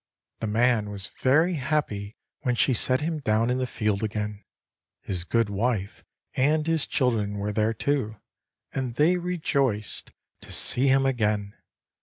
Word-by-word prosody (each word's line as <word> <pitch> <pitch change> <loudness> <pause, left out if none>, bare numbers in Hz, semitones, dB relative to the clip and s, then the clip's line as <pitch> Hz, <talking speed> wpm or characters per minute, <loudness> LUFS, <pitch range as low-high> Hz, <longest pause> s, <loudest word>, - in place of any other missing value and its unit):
The 110 - -2
man 110 0 +2
was 100 -1 -5
very 160 +8 +4
happy 130 -9 -2 0.2
when 125 -3 0
she 130 - +3
set 130 +3 +2
him 160 0 -2
down 115 -2 +1
in 125 - 0
the 130 - -1
field 105 -4 -1
again. 105 -1 -3 0.6
His 90 -3 -3
good 115 +5 +1
wife, 105 -1 -2 0.3
and 150 +4 +2
his 165 -2 +2
children 110 -6 0
were 100 +1 -2
there, 110 +1 +1
too; 130 -4 -1 0.6
and 130 -3 -3
they 165 +6 +4
rejoiced 140 - -1 0.3
to - - -12
see 130 +3 +3
him 135 0 +4
again. 105 -5 0
120 Hz, 150 wpm, -26 LUFS, 105-140 Hz, 0.6 s, very